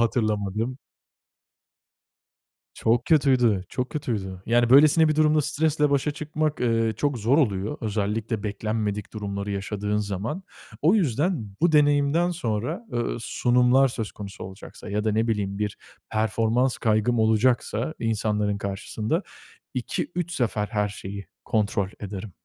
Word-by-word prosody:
hatırlamadım. 110 +1 0 2.0
Çok 115 +2 +1
kötüydü, 130 - +3
çok 125 0 -3
kötüydü. 100 -10 -4
Yani, 120 +1 +3
böylesine 155 +4 +7
bir 155 - +1
durumda 155 0 +4
stresle 150 0 +1
başa 140 +1 +1
çıkmak, 155 0 -2
eee, 115 -2 +1
çok 145 0 0
zor 115 +6 +2
oluyor. 105 -3 0
Özellikle 110 +1 -2
beklenmedik 105 0 -3
durumları 100 -1 -4
yaşadığın 105 +1 -2
zaman. 105 - -3 0.4
O 170 +8 +5
yüzden 145 - 0
bu 170 0 +4
deneyimden 145 +3 +3
sonra, 150 - -3
eee, 120 - -1 0.2
sunumlar 125 +3 +3
söz 115 -3 -4
konusu 100 -1 -8
olacaksa 95 +2 -10
ya 105 +1 -1
da 110 - +1
ne 110 +2 +1
bileyim 100 -3 -1
bir 105 -1 -2 0.3
performans 115 +3 +1
kaygım 110 +1 +1
olacaksa 115 +4 +2
insanların 105 -2 0
karşısında 105 - -2 0.5
2-3 175 +7 -3
sefer 110 -8 0
her 105 -2 0
şeyi 100 0 -7 0.2
kontrol 100 -3 0
ederim. 100 0 -6
115 Hz, 125 wpm, -25 LUFS, 105-140 Hz, 2.0 s, böylesine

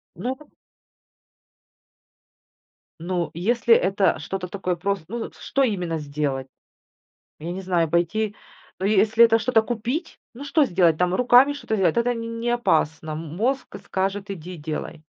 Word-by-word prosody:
Ну 245 +10 -3
да. 300 - -15 2.5
Ну, 175 0 -2
если 230 +7 +2
это 195 0 +2
что-то 190 -1 -4
такое 185 -1 -2
просто, 195 0 -2
ну, 235 +2 -5
с - - -20
что 275 - 0
именно 180 -9 -1
сделать? 140 -2 -3 0.9
Я 165 +3 -5
не 185 - -5
знаю, 175 -4 0
пойти 205 +6 0 0.4
но 190 - -1
если 215 +3 +5
это 225 0 +4
что-то 225 -1 +3
купить, 245 - -3 0.2
ну 255 - -9
что 285 +2 +3
сделать, 175 - +3
там 180 +2 +1
руками 250 +5 +5
что-то 285 -6 -3
сделать, 180 -5 +2
это 240 +1 +2
нь 230 0 -5
не 240 +1 -1
опасно. 160 -9 +1
М 160 +1 -6
мозг 255 +6 -1
скажет 195 +1 -2
иди 180 -1 -7
делай. 155 +1 -6
195 Hz, 150 wpm, -23 LUFS, 170-235 Hz, 2.5 s, если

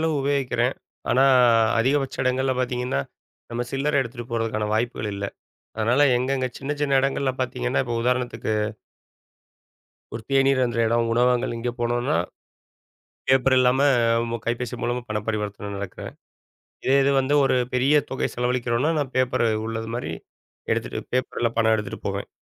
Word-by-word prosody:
அளவு 160 -1 +1
உபயோகிக்கிறேன். 135 -3 0 0.4
ஆனா, 130 - +4 0.6
அதிகபட்ச 135 +3 +1
இடங்கள்ல 130 +1 +1
பாத்தீங்கன்னா, 125 - -1 0.5
நம்ம 120 +1 -2
சில்லறை 140 +1 +1
எடுத்துட்டுப் 120 -1 -6
போறதுக்கான 110 -2 -1
வாய்ப்புகள் 110 -2 -1
இல்ல. 100 0 -4 0.5
அதனால 120 +5 +2 0.2
எங்க 130 +2 -2
எங்க 130 0 0
சின்ன 135 +2 -4
சின்ன 140 -2 +1
இடங்கள்ல 135 0 0
பாத்தீங்கன்னா, 125 0 -1
இப்ப 120 -1 -2
உதாரணத்துக்கு 125 -3 -1 1.6
ஒரு 115 - -5
தேநீர் 135 0 +3
அருந்துற 120 -1 0
எடம், 115 0 +1
உணவகங்கள் 125 0 +2
இங்க 120 +1 -2
போனோம்னா, 120 +1 0 1.1
பேப்பர் 130 0 +4
இல்லாம, 125 +1 +3 0.4
உங்க 115 0 -3
கைபேசி 120 0 -2
மூலமா 120 +1 -1
பணப் 105 -1 -3
பரிவர்த்தன 105 -1 -3
நடக்குது. 100 -2 -6 0.8
இதே 135 - +4
இது 140 - +3
வந்து 135 +2 0
ஒரு 135 - +3 0.2
பெரிய 130 +4 +3 0.2
தொகை 130 - -1
செலவளிக்கறோம்னா, 125 +3 0
நான் 135 -2 -3
பேப்பர் 130 -1 +2 0.2
உள்ளது 115 0 -4
மாரி 120 - -4 0.6
எடுத்துட்டு, - - -2
பேப்பர்ல 120 -2 0
பணம் 110 0 +4
எடுத்துட்டுப் 105 -1 -6
போவேன். - - -3
125 Hz, 140 wpm, -24 LUFS, 115-130 Hz, 1.6 s, ஆனா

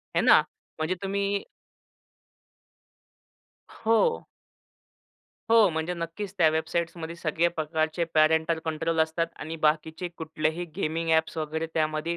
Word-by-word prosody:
है - - +4
ना. - - +7 0.4
म्हणजे 160 +4 0
तुम्ही 200 +1 -1 2.3
हो. 230 - +1 1.3
हो. 225 -3 +7
म्हणजे 160 +3 -2
नक्कीच 170 +4 -5
त्या 160 -2 +6
वेबसाईट्समध्ये 170 +1 -2
सगळे 170 +1 +1
प्रकारचे 160 0 -1
पॅरेंटल 160 +1 +3
कंट्रोल 160 +1 -1
असतात 160 +1 +1
आणि 160 +1 -5
बाकीचे 160 +3 0
कुठलेही 160 +1 -2
गेमिंग 165 +1 -1
ॲप्स 160 +1 +2
वगैरे 160 +1 -2
त्यामध्ये 155 +2 0
165 Hz, 110 wpm, -27 LUFS, 160-170 Hz, 2.3 s, ना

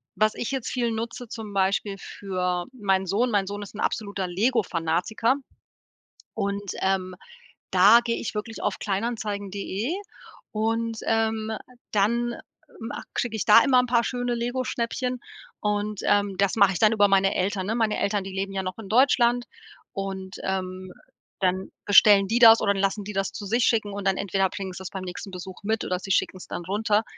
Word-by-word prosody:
was 215 0 +2
ich 240 - -3
jetzt 265 -3 -3
viel 240 -2 -1
nutze 230 +2 -5
zum 215 -3 -7
Beispiel 195 +1 +1
für 180 -3 -3
meinen 195 -5 0
Sohn, 220 +7 +1
mein 200 -3 +1
Sohn 205 +1 -5
ist 205 0 -9
'n - - -8
absoluter 200 -3 -2
Lego 220 +6 +1
Fanatiker 175 +8 0 1.0
und, 200 -2 -3
ähm, 190 -1 0 0.6
da 205 +6 +7
gehe 230 -1 -1
ich 220 - -5
wirklich 220 +1 -5
auf 205 -2 -1
Kleinanzeigen.de 205 - -3 0.6
und, 225 +1 -1
ähm, 225 -1 0 0.4
dann 235 +4 +1 0.4
ma 225 +1 -6
kriege 235 -2 -2
ich 215 - -2
da 210 - +8
immer 260 -3 +5
'n 250 - +2
paar 235 -1 +3
schöne 245 0 -2
Lego 245 +2 -2
Schnäppchen 250 +1 -2 0.4
und, 210 0 -1
ähm 205 -1 +2
das 200 -1 +2
mache 200 -3 +5
ich 175 - -4
dann 215 -1 +5
über 205 -2 +4
meine 195 0 +3
Eltern, 190 0 -1
ne? 220 - 0
Meine 225 -3 +1
Eltern, 200 -1 0
die 195 - -7
leben 195 +1 -3
ja 190 -1 -2
noch 185 0 -5
in 205 -3 -9
Deutschland 245 0 +4 0.5
und, 190 -1 -5
ähm, 185 -1 -3 0.5
dann 185 0 0
bestellen 205 -1 +7
die 230 +4 +1
das 225 -1 +8
oder 200 -1 +3
lassen 195 +1 -1
die 205 - -6
das 195 0 -1
zu 205 - -6
sich 230 +4 +2
schicken 215 -3 +1
und 200 -1 -3
dann 190 - +3
entweder 195 -1 0
bringen 190 0 -5
sie's 185 0 -7
beim 190 -1 -6
nächsten 180 +2 -7
Besuch 185 0 -8
mit 220 +2 0
oder 180 0 -2
sie 195 - -6
schicken's 185 0 0
dann - - -5
runter. 210 +3 +1
205 Hz, 185 wpm, -25 LUFS, 190-225 Hz, 1.0 s, da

